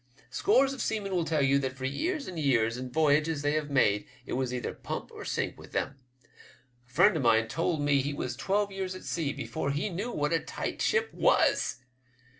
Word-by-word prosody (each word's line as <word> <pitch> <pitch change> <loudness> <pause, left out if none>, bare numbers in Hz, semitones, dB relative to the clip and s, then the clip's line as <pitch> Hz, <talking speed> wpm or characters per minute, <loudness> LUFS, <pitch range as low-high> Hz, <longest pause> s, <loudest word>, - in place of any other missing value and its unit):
Scores 275 -9 +3
of 265 - -5
seamen 205 -3 -2
will 175 -3 +1
tell 155 -2 +1
you 140 +1 +4
that 130 -1 -2
for 130 - -4
years 305 - -2
and 180 -3 -5
years, 115 -6 +2
in 125 0 -5
voyages 150 +2 +2
they 145 - +2
have 150 -1 -1
made, 105 -7 +2 0.2
it - - -5
was 130 -1 -1
either 125 -1 -3
pump - - -6
or - - -8
sink - - -2
with - - -13
them. 135 0 -2 0.2
A 125 -1 -26
friend 200 +9 +5
of 155 - 0
mine 115 -2 +4
told 165 +5 -1
me 145 -1 +3
he 145 +2 -2
was 125 -4 -3
twelve 200 +8 0
years 190 -1 -4
at 185 - -9
sea 160 -4 -1
before 150 0 -3
he 145 +8 -1
knew 205 +8 -3
what 150 -3 0
a 165 - +3
tight - - -5
ship 460 0 +1
was. - - +2
145 Hz, 215 wpm, -29 LUFS, 130-185 Hz, 0.2 s, friend